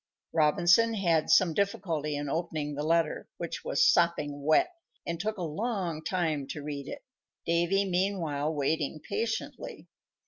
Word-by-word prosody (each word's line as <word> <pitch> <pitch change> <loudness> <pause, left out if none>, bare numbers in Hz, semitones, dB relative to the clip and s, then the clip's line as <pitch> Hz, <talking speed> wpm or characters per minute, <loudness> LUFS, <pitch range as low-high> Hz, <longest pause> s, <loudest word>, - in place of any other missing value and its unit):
Robinson 175 +8 +4
had 170 -6 +1
some 175 -4 +5
difficulty 165 -6 -1
in 145 0 -3
opening 155 -1 -2
the 145 - -4
letter, 165 +1 0
which - - -5
was 480 - +3
sopping 150 - +2
wet, 155 - +3 0.3
and 170 -1 -3
took 215 +4 -2
a 180 - -3
long 170 -2 -2
time 160 -5 -1
to 150 - -6
read 145 -1 -5
it, 285 - -7 0.4
Davy, 175 +4 +2
meanwhile, 175 -6 0
waiting 155 +1 -1
patiently. 230 - -4
165 Hz, 140 wpm, -29 LUFS, 150-195 Hz, 0.4 s, some